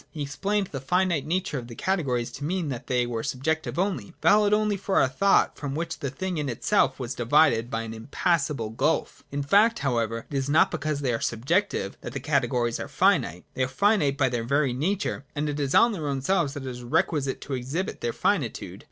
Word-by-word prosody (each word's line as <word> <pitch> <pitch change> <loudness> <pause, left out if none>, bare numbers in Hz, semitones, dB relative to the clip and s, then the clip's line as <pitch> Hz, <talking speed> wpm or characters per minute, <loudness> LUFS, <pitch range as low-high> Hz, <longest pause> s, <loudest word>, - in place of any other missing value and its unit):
He 150 -3 -5
explained 195 +9 -1
the 135 - -5
finite 170 -1 +1
nature 175 -4 -1
of 120 - -9
the 120 - -9
categories 135 -11 -1
to 140 - -8
mean 170 0 -1
that 125 -1 -6
they 125 -1 +1
were 120 -2 -3
subjective 155 +8 -2
only, 185 -1 -2
valid 210 0 +4
only 210 0 +2
for 195 0 -3
our - - +4
thought, 195 +10 +3
from 140 -2 -4
which 165 +2 -3
the 140 - -2
thing 180 +5 -3
in 145 -2 -2
itself 130 +3 +1
was 125 -1 -3
divided 120 -1 +3
by 115 -1 -2
an 115 0 -6
impassable 140 0 -1
gulf 145 +8 -1
In 140 0 -2
fact, 210 +10 +4
however, 115 -4 -1
it - - -4
is 135 0 -1
not 155 +3 +4
because 155 -1 -2
they 130 -3 0
are 115 - -2
subjective, 130 - 0
that - - -7
the 140 - -3
categories 130 -4 0
are - - -4
finite: 90 +3 +1
they - - -3
are - - +1
finite 150 -2 +2
by 135 - +3
their 120 -1 -2
very 140 +1 +1
nature, 175 +4 -1
and 150 +1 -1
it 145 0 -3
is 140 -2 0
on 235 - +6
their 165 -8 -4
own 135 -2 -2
selves 165 -4 +1
that 140 -2 -6
it - - -3
is 125 -1 -7
requisite 135 +3 0
to 140 - -6
exhibit 135 - -3
their 120 - -1
finitude. - - -1
140 Hz, 220 wpm, -26 LUFS, 125-170 Hz, -, on